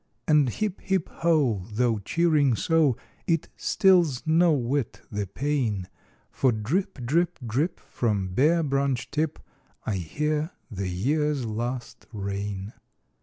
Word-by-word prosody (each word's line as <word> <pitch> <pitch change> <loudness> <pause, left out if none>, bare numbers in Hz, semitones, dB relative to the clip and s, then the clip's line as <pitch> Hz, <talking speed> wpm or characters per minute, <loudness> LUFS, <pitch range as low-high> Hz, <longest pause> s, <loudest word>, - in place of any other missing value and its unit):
And 150 -4 +4
hip, 205 - -3
hip, 190 -3 0
ho! 150 - +2
though 115 0 +1
cheering 150 - +2
so, 160 -3 +2 0.3
It 165 -2 +1
stills 175 -9 +3
no 165 +2 +4
whit 135 -2 -1
the 105 -1 -2
pain; 115 -5 -1 0.4
For 130 - +2
drip, 125 - -2
drip, 170 +7 +1
drip, 135 +10 -1
from 105 -5 -1
bare 155 - +3
branch 135 -3 0
tip, 155 +1 -1 0.5
I 105 -3 -1
hear 150 - -1 0.2
the 100 -2 -3
year's 140 - 0
last 120 +3 -4
rain. 100 -1 -4
135 Hz, 120 wpm, -26 LUFS, 110-155 Hz, 0.5 s, And